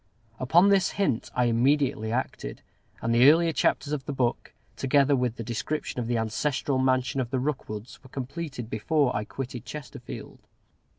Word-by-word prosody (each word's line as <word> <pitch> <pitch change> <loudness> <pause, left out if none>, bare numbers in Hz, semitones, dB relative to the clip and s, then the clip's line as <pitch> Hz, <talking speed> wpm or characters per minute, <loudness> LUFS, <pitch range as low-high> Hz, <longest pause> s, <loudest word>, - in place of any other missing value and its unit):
Upon 170 +10 +5
this 195 -3 +3
hint 190 - 0
I 125 - +3
immediately 120 -1 +2
acted; 115 - -3 0.4
and 115 0 +1
the 125 +4 +8
earlier 165 +1 +4
chapters 145 0 +1
of 135 -3 -3
the - - -3
book, 125 -3 -1 0.2
together 140 +1 +3
with 125 -3 0
the 115 - -5
description 125 +5 -3
of 120 - -2
the 120 0 +1
ancestral 130 +4 0
mansion 130 0 +1
of 120 - -3
the 130 - -1
Rookwoods, 125 -5 -4
were 130 - -16
completed 135 -1 -5
before 130 +4 +1
I 105 +1 -1
quitted 125 -1 -6
Chesterfield. 150 0 -8
130 Hz, 165 wpm, -27 LUFS, 120-145 Hz, 0.4 s, the